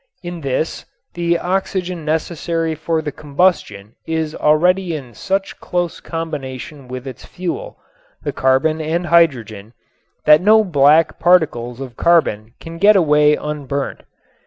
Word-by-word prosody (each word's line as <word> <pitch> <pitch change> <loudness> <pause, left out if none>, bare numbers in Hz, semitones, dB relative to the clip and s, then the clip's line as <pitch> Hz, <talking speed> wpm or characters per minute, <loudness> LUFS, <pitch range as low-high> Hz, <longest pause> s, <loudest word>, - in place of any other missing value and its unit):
In 175 -1 -6
this 140 +3 -2 0.3
the 170 0 0
oxygen 180 -1 -2
necessary 165 +1 -2
for 160 +1 -2
the 150 - -3
combustion 140 - -1
is 160 -1 -2
already 175 +4 +2
in 130 -5 -8
such 195 - -3
close 175 -2 -3
combination 145 -4 -6
with 125 +1 -7
its 130 -3 -9
fuel, 420 - -6 0.5
the 145 - -3
carbon 135 +5 +1
and 165 +3 -2
hydrogen, 120 -11 +1 0.5
that 150 +1 +7
no 215 +3 +5
black 155 -2 +3
particles 130 -9 +2
of 130 -4 -8
carbon 120 -10 +1
can 165 0 -9
get 210 +3 +6
away 150 -4 +4
unburnt. 140 -2 -4
155 Hz, 130 wpm, -18 LUFS, 135-175 Hz, 0.5 s, that